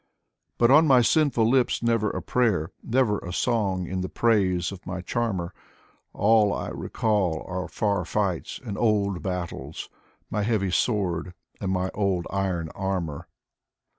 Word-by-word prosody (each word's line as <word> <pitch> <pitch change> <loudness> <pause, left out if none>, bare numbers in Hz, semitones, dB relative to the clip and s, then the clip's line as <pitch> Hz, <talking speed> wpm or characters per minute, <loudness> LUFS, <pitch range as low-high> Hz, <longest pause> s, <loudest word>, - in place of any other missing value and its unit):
But 120 +1 +4
on 155 +3 +7
my 130 -3 +6
sinful 140 -5 +3
lips 125 0 +2
never 115 -2 +2
a 90 - -4
prayer, 100 -8 +1
Never 115 -4 +1
a 90 - -7
song 95 -4 0
in 95 +2 -3
the 95 - -3
praise 95 -7 +1
of 95 -2 -9
my 90 0 -4
charmer; 95 -4 -2 0.6
All 105 -1 +4
I - - -3
recall 95 -7 -1
are 90 0 -3
far 100 -3 0
fights 95 -1 -2
and 100 -4 -4
old 100 -5 +1
battles. 85 -6 -5 0.4
My 105 - 0
heavy 105 -3 0
sword 90 -4 0 0.2
and 95 - -2
my 95 0 -1
old 95 -4 0
iron 95 -4 -1
armor. 90 -5 -3
100 Hz, 145 wpm, -25 LUFS, 90-110 Hz, 0.6 s, on